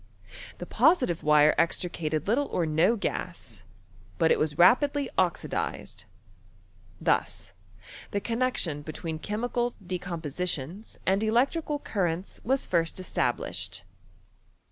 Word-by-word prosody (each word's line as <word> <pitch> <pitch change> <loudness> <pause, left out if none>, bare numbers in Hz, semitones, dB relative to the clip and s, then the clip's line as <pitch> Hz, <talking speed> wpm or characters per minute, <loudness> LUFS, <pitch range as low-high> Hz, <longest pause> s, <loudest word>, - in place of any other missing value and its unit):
The - - -6
positive 250 - +3
wire 150 0 +5
extricated 160 -2 -1
little 265 +7 +2
or 170 - 0
no 160 +8 +3
gas; 130 - -4 0.5
but 165 -2 +3
it - - +3
was 155 -1 0
rapidly 275 - +4
oxidized. - - -2 0.9
Thus - - 0 0.6
the 200 - -1
connexion 230 - -1
between 155 +1 -5
chemical 240 +5 -2
decompositions 175 0 -4
and 195 +2 +3
electrical 275 +8 +1
cur 200 -10 -1
Tents 170 +4 -5
was 265 +3 +1
first 165 +1 +1
established. 135 - -1
180 Hz, 105 wpm, -28 LUFS, 160-235 Hz, 0.9 s, wire